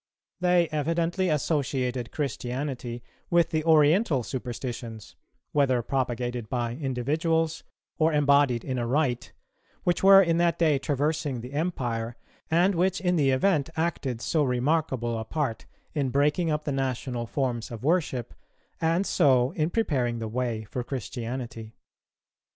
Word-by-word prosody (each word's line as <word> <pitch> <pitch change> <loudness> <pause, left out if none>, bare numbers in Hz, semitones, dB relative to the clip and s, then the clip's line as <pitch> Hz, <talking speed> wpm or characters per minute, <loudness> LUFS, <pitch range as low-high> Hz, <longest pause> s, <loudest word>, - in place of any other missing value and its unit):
They 180 -1 +3
evidently 165 +4 0
associated 130 -5 -1
Christianity 125 -3 -4 0.3
with 170 -1 +3
the 155 -1 0
oriental 155 - +4
superstitions, 120 -3 -6 0.4
whether 130 -4 +2
propagated 120 -3 -2
by 120 -2 -1
individuals 155 +5 -1 0.4
or 160 +1 +4
embodied 140 -5 +3
in 130 -2 -2
a 120 - -2
rite, 130 -2 0 0.5
which 175 -1 +1
were 195 0 +9
in 170 -3 +3
that 170 -1 +2
day 155 -5 +3
traversing 145 -2 -1
the 125 +3 -9
Empire, 120 -8 -2 0.3
and 175 +5 +3
which 185 +2 +1
in 180 -1 +1
the 145 -5 +3
event 145 +3 +2
acted 145 -8 -1
so 155 +2 +1
remarkable 125 -3 0
a - - -3
part 135 -1 -3 0.3
in 140 -5 0
breaking 150 +5 +2
up 150 0 -1
the 145 - -2
national 130 -3 -2
forms 120 +1 -2
of 115 -1 -8
worship, 145 -6 0 0.5
and 165 +4 +1
so 130 -8 +3
in 155 0 -1
preparing 135 - 0
the 115 -1 -4
way 115 -1 -2
for 120 +3 -5
Christianity. 120 -2 -5
135 Hz, 135 wpm, -27 LUFS, 120-160 Hz, 0.5 s, were